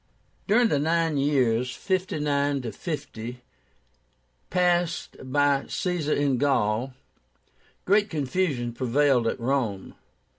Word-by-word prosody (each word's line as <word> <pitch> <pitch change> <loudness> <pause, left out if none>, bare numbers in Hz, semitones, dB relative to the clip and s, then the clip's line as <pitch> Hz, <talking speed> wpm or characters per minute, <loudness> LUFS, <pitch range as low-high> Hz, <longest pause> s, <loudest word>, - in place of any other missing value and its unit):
During 225 +3 +4
the 145 - +1
nine 165 0 +1
years 125 -4 +1
(59 145 - -1
50) 125 -7 -6 1.1
passed 175 -1 +1
by 140 +1 +1
Caesar 175 -5 -1
in 140 -4 +1
Gaul, 125 -2 +1 0.9
great 205 +2 +3
confusion 140 -5 -1
prevailed 130 0 +2
at - - -2
Rome. 115 -6 -1
140 Hz, 90 wpm, -26 LUFS, 125-165 Hz, 1.1 s, During